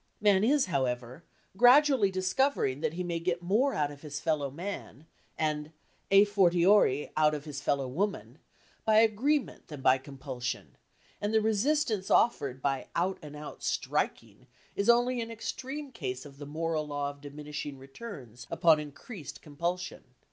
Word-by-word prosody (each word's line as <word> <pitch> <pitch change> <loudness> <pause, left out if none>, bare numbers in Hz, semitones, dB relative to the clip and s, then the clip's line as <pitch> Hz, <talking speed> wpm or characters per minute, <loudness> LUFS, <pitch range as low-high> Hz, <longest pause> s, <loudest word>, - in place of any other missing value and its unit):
Man 205 -2 +4
is, 275 +4 +4
however, 130 -2 -2 0.3
gradually 250 -1 +6
discovering 185 - 0
that 160 -1 -1
he 180 +2 -3
may 170 -1 -2
get 175 +1 -2
more 225 +10 +2
out 145 -1 0
of 145 -1 -12
his 145 -2 -6
fellow 150 -4 0
man 160 -2 -7 0.3
(and 150 -1 -1 0.4
à 200 +1 +7
fortiori 180 -6 +4
out 155 0 +3
of 145 0 -7
his 145 -2 -6
fellow 140 -1 0
woman) 195 +10 -3 0.4
by 220 - +3
agreement 230 +7 +2
than 150 -4 -8
by 130 0 +4
compulsion, 130 -2 -6 0.5
and 210 +2 0
the - - +6
resistance 220 0 +1
offered 135 - +2
by 135 -2 -1
out 185 +3 0
and 150 -2 -10
out 150 0 -9
striking - - -2 0.3
is 200 +3 0
only 245 +1 +4
an 230 - -5
extreme 265 +5 -5
case 130 - -5
of 140 -1 -13
the 145 - -7
moral 155 0 -2
law 145 -1 -2
of 145 0 -18
diminishing 145 0 -7
returns 135 - -10
upon 165 -1 +4
increased 150 - -9
compulsion. 170 +5 -4
165 Hz, 155 wpm, -30 LUFS, 145-210 Hz, 0.5 s, à